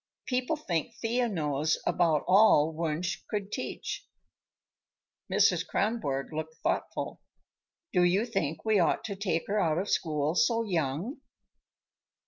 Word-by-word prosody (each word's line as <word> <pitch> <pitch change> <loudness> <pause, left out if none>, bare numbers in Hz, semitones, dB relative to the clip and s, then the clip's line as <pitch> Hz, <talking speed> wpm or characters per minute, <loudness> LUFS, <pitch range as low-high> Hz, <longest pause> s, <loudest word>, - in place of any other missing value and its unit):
People 255 +4 0
think 230 - -3
Thea 240 +1 0
knows 155 -4 0
about 160 -4 +2
all 185 -6 +5
Wunsch 165 +2 -2
could 205 -1 -3
teach." - - -5 1.2
Mrs. - - +4
Kronborg 165 -11 -1
looked 160 +1 -4
thoughtful. - - -2 0.7
"Do 180 - +4
you 180 +5 +3
think 160 -9 -2
we 215 -2 +3
ought 170 - +2
to 200 - -4
take 185 -4 -1
her 210 +1 0
out 160 -5 +2
of 195 +3 -2
school 150 -1 0
so 230 +5 +2
young?" 175 - -2
180 Hz, 125 wpm, -29 LUFS, 155-220 Hz, 1.2 s, all